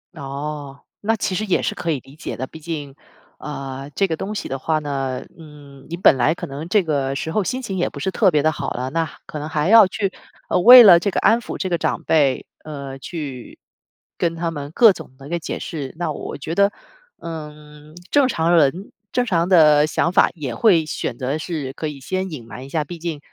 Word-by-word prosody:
哦， 140 -1 -6 0.2
那 225 +2 +1
其 210 -2 -2
实 200 - -1
也 190 - +1
是 - - -1
可 170 - -4
以 145 - -1
理 135 - -17
解 155 - -6
的。 130 - -3
毕 160 +4 -12
竟 150 -4 -6 0.4
呃， 135 -1 -6
这 195 - +2
个 165 - -2
东 195 +6 -5
西 - - -4
的 135 0 -4
话 160 +2 0
呢， 135 -3 -3
嗯， 145 -3 -14
你 170 - -4
本 180 - +5
来 125 +6 +2
可 - - -6
能 140 +4 -7
这 205 0 +3
个 140 -4 -1
时 160 +3 -3
候 210 +4 +1
心 255 +7 -3
情 195 -6 -4
也 175 - 0
不 140 - -9
是 190 - -2
特 200 -1 +3
别 150 -4 +1
地 155 - +3
好 150 - -4
了， 125 +1 -3
那 165 0 -1 0.2
可 150 - -7
能 150 +2 -5
还 155 +2 0
要 220 -3 +8
去 195 +1 -2 0.4
呃， - - +2
为 245 +5 +11
了 175 -5 +9
这 200 - -1
个 - - -1
安 230 +2 +3
抚 - - -6
这 190 - -2
个 175 - +1
长 - - -1
辈， 145 -5 +2 0.2
呃， 140 -3 -7
去 140 -7 -7 0.6
跟 165 -1 0
他 165 0 -2
们 145 -2 -6
各 225 +2 +6
种 130 - -11
地 135 0 -12
那 170 +3 -2
解 - - -5
释。 140 -5 -6
那 170 -3 -2
我 - - -6
觉 155 +3 -5
得， 200 +3 +3 0.5
嗯， 150 -1 -10 0.2
正 285 -2 +4
常 170 -8 +1
人 165 +5 +2 0.2
正 250 0 +1
常 175 -5 0
的 155 -4 +6
想 170 - 0
法 - - +5
也 140 -7 -5
会 170 - +3
选 - - -4
择 135 +4 -2
是 155 -5 -4
可 155 - -4
以 145 -2 -7
先 185 +7 -3
隐 130 -7 -8
瞒 125 +4 -9
一 - - -11
下， 155 +1 -1
毕 170 +2 -9
竟 165 -3 -4
155 Hz, 245 characters per minute, -21 LUFS, 140-180 Hz, 0.6 s, 为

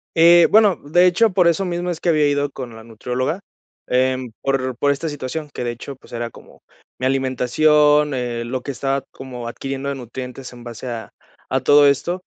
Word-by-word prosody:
Eh, 170 +1 +7
bueno, 210 -3 +5
de 175 +5 +3
hecho, 215 +5 +3
por 180 -2 +4
eso 170 +3 +1
mismo 175 0 -2
es 170 -2 -5
que - - -2
había 155 -3 +3
ido 145 0 0
con 125 -4 -8
la 110 - -11
nutrióloga, 125 - -3 0.5
em, 130 -1 0
por 130 -2 -1
por 145 +4 +1
esta 140 +4 -1
situación, 145 +1 -5
que 125 - -5
de 120 - -1
hecho, 130 +4 -9
pues - - -20
era 120 0 -4
como, - - -17 0.4
mi 130 - -1
alimentación, 145 +3 +3
eh, 120 -2 -3
lo 125 +2 -4
que 140 - -5
estaba 135 +1 -1
como 125 -3 -8
adquiriendo 135 +3 -5
de 140 - -1
nutrientes 125 +1 -8
en 120 -1 -12
base 120 +1 -7
a 115 -2 -6 0.4
a 130 - +1
todo 145 +3 +6
esto, 170 +6 +1
135 Hz, 200 wpm, -20 LUFS, 125-155 Hz, 0.5 s, Eh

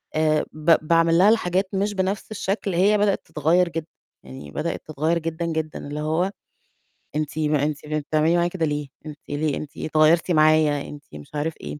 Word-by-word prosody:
آآ 155 -1 +2
ب 155 +2 +4
باعمل 165 0 +4
لها 195 +4 +6
الحاجات 190 -3 +1
مش 200 +2 0
بنَفْس 195 +2 -2
الشكل 195 -2 -2
هي 200 +4 +4
بدأت 205 -1 +1
تتغيّر 160 +3 +2
جد 165 -1 -4 0.4
يعني 65 +2 -10
بدأت 170 - -4
تتغيّر 155 +3 0
جدًا، 165 +1 -3
جدًا 160 -1 -3
اللي 150 +1 -5
هو 160 +5 0 0.8
أنتِ 155 +1 -2
ما 150 -2 +1
أنتِ 150 0 -3
بن 155 0 -1
بتعملي 155 +3 +1
معايا 175 0 +2
كده 170 -3 -1
ليه 145 -1 -2 0.2
أنتِ 150 -1 -8
ليه، 145 0 -1
أنتِ 150 - -8
اتغيّرتِ 160 +3 +3
معايا، 155 -2 +4
أنتِ 145 -1 -10
مش 75 - -11
عارف 155 +2 -1
إيه. 75 0 -6
155 Hz, 185 wpm, -23 LUFS, 150-175 Hz, 0.8 s, لها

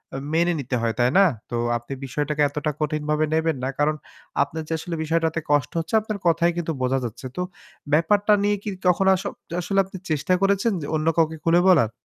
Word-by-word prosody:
অ - - -2 0.2
মেনে 170 +2 +3
নিতে 130 -2 -3
হয়। 115 -1 0
তাই 120 0 +4
না? 195 - +7 0.2
তো 120 - -3 0.2
আপনি 120 +3 -8
বিষয়টাকে 150 +3 -2
এতটা 150 +1 -2
কঠিনভাবে 150 0 0
নেবেন 160 -2 +1
না। 130 - 0
কারণ 150 +1 +2 0.5
আপনার 160 0 -6
যে 165 - -2
আসলে 170 +1 -5
বিষয়টাতে 160 0 0
কষ্ট 145 -2 +2
হচ্ছে 165 +4 -6
আপনার 215 -1 -4
কথাই 170 +1 +3
কিন্তু 170 -1 -1
বোঝা 130 +1 +1
যাচ্ছে। 120 +2 -6
তো - - -2 0.5
ব্যাপারটা 205 +7 +4
নিয়ে 205 0 +2
কি 215 - -3 0.2
কখনো 190 +2 +4
আস 185 - -5 0.4
আসলে 195 +3 0
আপনি 190 0 -9
চেষ্টা 155 +3 +1
করেছেন 200 +3 +2 0.2
অন্য 155 +1 -1
কাউকে 160 -1 +2
খুলে 170 +1 +4
বলার? 145 -12 +4
160 Hz, 195 wpm, -23 LUFS, 145-175 Hz, 0.5 s, না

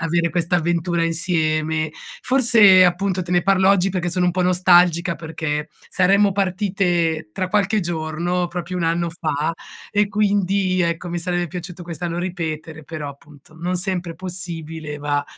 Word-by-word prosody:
avere 170 +1 +1
quest'avventura 170 0 0
insieme. 160 -2 0 0.3
Forse, 225 -8 +6
appunto, 185 +1 +1
te 175 - -9
ne 175 0 +3
parlo 190 0 +4
oggi 195 -1 +3
perché 175 -2 -2
sono 180 0 +1
un - - +3
po' 180 +1 -1
nostalgica 180 -1 +4
perché 155 -2 -4 0.2
saremmo 195 +2 +3
partite 180 - 0
tra 185 - -2
qualche 210 +1 +1
giorno 170 +1 -2
proprio 175 +1 -5
un 180 - -2
anno 170 +1 0
fa 160 -1 -2 0.4
e 205 0 +2
quindi, 200 -3 +1
ecco, 170 +1 -2
mi 175 0 -3
sarebbe 175 +1 -1
piaciuto 175 +1 -8
quest'anno 170 0 -4
ripetere, 160 -3 -5
però, 155 -1 -6
appunto, 145 +2 -15
non 175 +3 -2
sempre 180 -2 -3
possibile 165 -4 -6
va 145 0 -1
175 Hz, 150 wpm, -21 LUFS, 165-185 Hz, 0.4 s, Forse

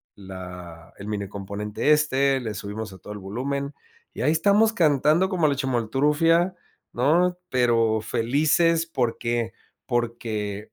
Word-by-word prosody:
la 90 -4 -10
el 100 - -9
minicomponente 100 +4 -2
este, 140 -3 +3
le 110 -4 -4
subimos 105 0 -6
a 95 - -13
todo 105 - -9
el 105 - -8
volumen, 140 +8 -4 0.4
y - - -6
ahí 150 +5 +3
estamos 205 +7 +3
cantando 155 +2 +3
como 170 -5 +2
la 140 - +1
Chimoltrufia, 145 +8 +1 0.4
¿no?, 175 +8 +2
pero 115 -3 +2
felices 155 +9 +2
porque 120 -4 -1 0.3
porque 115 -4 -2
125 Hz, 125 wpm, -24 LUFS, 105-150 Hz, 0.4 s, este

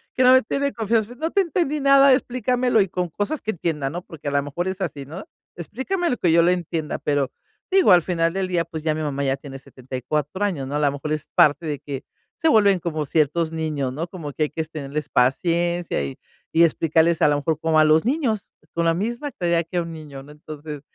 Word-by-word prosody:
que 255 - +3
no 255 0 +7
me 260 -2 +6
tiene 280 +5 -1
confianza. 225 +1 0
No 320 +6 -3
te 400 - +3
entendí 330 -4 -1
nada. 275 -1 +6
Explícamelo 250 -1 +1
y 195 - 0
con 180 0 -2
cosas 205 - -3
que 220 - -2
entienda, 160 -7 -2
¿no? 175 +5 -6
Porque 160 -5 -10
a 145 - 0
la 140 - +2
mejor 170 +6 -3
es 190 +1 -4
así, 145 -6 -4
¿no? 170 +8 -8 0.3
Explícamelo 265 - -2
que 170 - +2
yo 165 0 +5
lo 175 - +4
entienda. 170 -3 -3
Pero, 145 -3 0 0.4
digo, 380 -1 +5
al 175 -2 +6
final 165 -2 0
del 190 0 -1
día, 175 -2 0
pues, 160 -1 -7
ya 155 -1 +1
mi 155 - -4
mamá 140 -2 -2
ya 135 -1 +1
tiene 135 -1 -10
74 135 +7 -4
años, 155 -10 -2
¿no? 145 +2 -2
La 145 -1 +2
mejor 145 +2 -5
es 155 -1 -2
parte 150 +3 +4
de 150 -3 -3
que 140 -2 -6 0.3
se 325 - +2
vuelven 200 -6 +4
como 155 -3 -3
ciertos 160 +3 +1
niños, 150 -5 -2
¿no? 160 +5 -4
Como 165 -5 -7
que 155 - -1
hay 150 - 0
que 160 - -4
es 160 - -6
tenerles 150 -1 -5
paciencia 170 - +1
y 70 -1 -6 0.4
y 170 - +7
explicarles, 165 +1 +2
a - - +7
la 145 - +3
mejor 150 +2 -1
como 160 -1 +2
a - - +7
los 155 +4 +4
niños, 250 -7 -1 0.2
con 170 0 +1
la 165 - +3
misma 235 - -3
claridad 170 -2 0
que 180 - -3
a 175 - +2
un 165 - -6
niño, 150 -4 -9
¿no? 145 +2 -14
Entonces, 150 -1 -9
165 Hz, 235 wpm, -22 LUFS, 150-205 Hz, 0.4 s, no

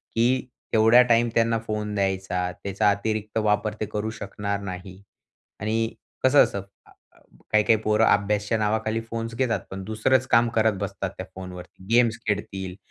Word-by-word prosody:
की 115 +1 +3 0.5
तेवढा 115 +2 +7
टाईम 115 0 +4
त्यांना 115 0 +2
फोन 105 -1 -3
द्यायचा, 95 -2 -1
त्याचा 100 +2 +1
अतिरिक्त 110 +1 -2
वापर 105 0 +1
ते 110 - -1
करू 105 +1 -2
शकणार 100 0 -3
नाही. 90 0 -8 0.6
आणि 110 +2 0 0.3
कसं 135 +2 +7
असतं, 100 - -3 0.2
अ, - - -21 0.6
काही 105 0 +4
काही 110 +1 +4
पोरं 110 +1 +3
अभ्यासच्या 105 +2 +2
नावाखाली 110 +1 0
फोन्स 115 0 -4
घेतात. 125 -3 0
पण 95 0 -6
दुसरंच 120 +5 +1
काम 115 0 +5
करत 110 -1 +4
बसतात 100 0 -3
त्या - - -5
फोनवरती. 90 0 -10
गेम्स 120 -2 +4
खेळतील, 95 -3 -3
105 Hz, 155 wpm, -25 LUFS, 100-115 Hz, 0.6 s, तेवढा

